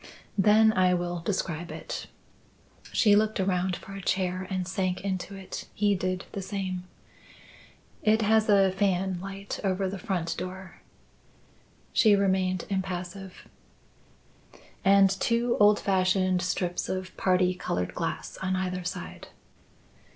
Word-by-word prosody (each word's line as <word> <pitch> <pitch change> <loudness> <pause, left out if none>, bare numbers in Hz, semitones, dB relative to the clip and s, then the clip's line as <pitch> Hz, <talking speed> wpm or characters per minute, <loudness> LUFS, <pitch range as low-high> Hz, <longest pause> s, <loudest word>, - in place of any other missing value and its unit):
"Then 215 +2 +6
I 185 -2 +3
will 175 0 -2
describe 170 -2 -3
it." - - -6 0.8
She 210 -4 +5
looked 215 0 +2
around 185 -1 +1
for 195 - -10
a 195 - -6
chair 185 0 -1
and 185 -2 -2
sank 185 -1 -1
into 190 0 -3
it. 195 -1 -7
He 205 0 +2
did 185 0 -2
the 200 - -4
same. 190 -2 -4 1.2
"It 220 0 +3
has 220 +1 +3
a 195 -2 +5
fanlight 195 0 -2
over 190 0 0
the 190 +1 -5
front 175 -3 -2
door." 185 +1 -8 1.1
She 215 -3 +5
remained 190 -2 +1
impassive. 190 0 -5 1.4
"And 195 0 +6
two 235 +4 +1
old 205 0 +6
fashioned 185 -1 +2
strips 180 0 -2
of 185 0 -4
parti 185 -1 +2
coloured 90 - -3
glass - - -4
on 190 0 0
either 185 -1 -2
side." 180 - -6
190 Hz, 125 wpm, -27 LUFS, 185-200 Hz, 1.4 s, Then